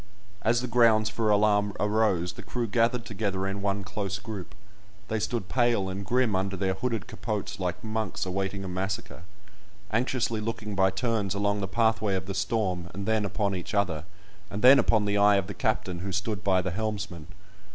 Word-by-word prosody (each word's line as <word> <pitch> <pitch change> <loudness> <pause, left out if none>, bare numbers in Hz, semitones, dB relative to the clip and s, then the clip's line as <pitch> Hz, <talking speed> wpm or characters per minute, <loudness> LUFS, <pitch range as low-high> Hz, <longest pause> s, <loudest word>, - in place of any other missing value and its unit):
As 120 +3 +2
the 125 - -3
grounds 115 -3 +4
for 110 0 0
alarm 105 -1 +3
arose, 105 -5 +1
the - - -9
crew 120 -1 -3
gathered 115 +2 +1
together 100 -3 -2
in 95 0 -3
one 100 0 -1
close 100 0 -3
group; 100 -3 -7 0.5
they 110 - 0
stood 110 -1 -2
pale 120 -6 +2
and 95 +1 -4
grim 120 +1 +2
under 95 +1 -1
their 95 0 0
hooded 115 +3 -2
capotes 105 -2 -4
like 90 -1 -2
monks 110 -4 -2
awaiting 95 +1 -2
a - - -4
massacre, 95 -1 -4 0.7
anxiously 115 -1 0
looking 105 -1 -4
by 95 -1 +3
turns 100 -1 -1
along 100 0 0
the 100 - -1
pathway 110 0 +2
of 95 0 -3
the 95 - -4
storm 95 -3 -1
and 100 0 -4
then 110 -1 +1
upon 100 +1 -1
each 90 +3 -4
other, 85 -6 0 0.4
and 105 +2 -5
then 130 +2 +9
upon 110 -3 +3
the 100 0 +1
eye 105 0 +6
of 100 -2 +1
the 100 - -6
captain 110 -8 -1
who 95 +2 -4
stood 100 +1 -2
by 95 -2 +3
the 95 - -2
helmsman. 100 -5 -4
100 Hz, 190 wpm, -28 LUFS, 95-110 Hz, 0.7 s, then